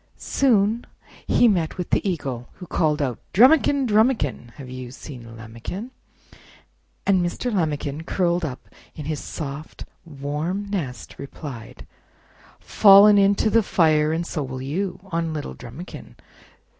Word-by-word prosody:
Soon 225 Hz, -3 st, +2 dB, 0.4 s
lie 245 Hz, -, +4 dB
met 175 Hz, -7 st, 0 dB
with 180 Hz, -, -5 dB
the -, -, +3 dB
Eagle, 130 Hz, -8 st, -4 dB
who 180 Hz, -, -11 dB
called 155 Hz, -3 st, 0 dB
out: 125 Hz, -4 st, -3 dB, 0.2 s
"Drumikin! 275 Hz, +4 st, +5 dB
Drumikin! 215 Hz, -, +1 dB
Have 135 Hz, -3 st, -10 dB
you 130 Hz, -1 st, -7 dB
seen 120 Hz, -3 st, -10 dB
Lambikin?" 115 Hz, -, -7 dB, 1.1 s
And 190 Hz, -3 st, +3 dB
Mr. 220 Hz, +7 st, -2 dB
Lambikin, 155 Hz, -4 st, -2 dB
curled 175 Hz, -2 st, +1 dB
up 135 Hz, -5 st, -5 dB, 0.3 s
in 150 Hz, -, -7 dB
his 155 Hz, -1 st, -3 dB
soft 150 Hz, 0 st, -7 dB, 0.2 s
warm 155 Hz, +6 st, -4 dB
nest, 145 Hz, -11 st, -5 dB
replied: 135 Hz, -5 st, -9 dB, 0.7 s
"Fallen 205 Hz, 0 st, +7 dB
into 200 Hz, +2 st, +3 dB
the 230 Hz, -, +5 dB
fire, 155 Hz, -6 st, +2 dB
and 165 Hz, +2 st, -1 dB
so 160 Hz, -, -3 dB
will 130 Hz, -1 st, -5 dB
you 180 Hz, +7 st, -3 dB
On 165 Hz, -1 st, -1 dB
little 150 Hz, -, -5 dB
Drumikin. 130 Hz, +9 st, -10 dB
160 Hz, 130 wpm, -23 LUFS, 140-200 Hz, 1.1 s, Fallen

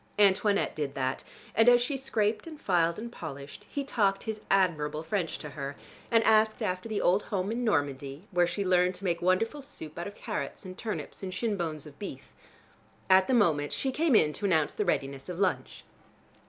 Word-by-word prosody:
Antoinette 205 Hz, 0 st, +3 dB
did 145 Hz, -2 st, -3 dB
that, 130 Hz, 0 st, -1 dB, 0.3 s
and 225 Hz, +2 st, +6 dB
as 245 Hz, 0 st, +7 dB
she 245 Hz, +4 st, -1 dB
scraped 225 Hz, -3 st, -1 dB
and 310 Hz, -2 st, -9 dB
filed 170 Hz, -, +2 dB
and 235 Hz, +2 st, -6 dB
polished, 140 Hz, -8 st, -8 dB
he 285 Hz, -, -2 dB
talked 200 Hz, -8 st, +1 dB
his 220 Hz, -2 st, -4 dB
admirable 155 Hz, -6 st, +1 dB
French 170 Hz, 0 st, -2 dB
to 150 Hz, -, -8 dB
her, 140 Hz, -1 st, -5 dB, 0.3 s
and 230 Hz, -1 st, +4 dB
asked 220 Hz, 0 st, +3 dB
after 185 Hz, +4 st, -2 dB
the 215 Hz, -, -1 dB
old 185 Hz, +4 st, +3 dB
home 195 Hz, 0 st, -2 dB
in 240 Hz, +2 st, -2 dB
Normandy, 145 Hz, -, -1 dB
where 175 Hz, -2 st, +3 dB
she 185 Hz, +3 st, -2 dB
learned 180 Hz, 0 st, +3 dB
to 180 Hz, -, -9 dB
make 175 Hz, -3 st, 0 dB
wonderful 185 Hz, +11 st, +1 dB
soup 160 Hz, -, -8 dB
out 175 Hz, -, -3 dB
of 205 Hz, -, -9 dB
carrots -, -, -5 dB
and 185 Hz, 0 st, -7 dB
turnips 215 Hz, +1 st, -5 dB
and 185 Hz, -1 st, -5 dB
shin 220 Hz, 0 st, 0 dB
bones 160 Hz, -5 st, -3 dB
of 145 Hz, -1 st, -13 dB
beef. 200 Hz, -, -8 dB, 0.8 s
At 190 Hz, 0 st, +6 dB
the 260 Hz, -, +3 dB
moment 155 Hz, -10 st, +3 dB
she 265 Hz, -, -1 dB
came 300 Hz, -1 st, +2 dB
in 150 Hz, -7 st, +4 dB
to 205 Hz, -, -4 dB
announce 160 Hz, -6 st, +2 dB
the -, -, -1 dB
readiness 135 Hz, +1 st, -2 dB
of 180 Hz, -, -5 dB
lunch. 190 Hz, -1 st, -1 dB
185 Hz, 200 wpm, -29 LUFS, 155-220 Hz, 0.8 s, as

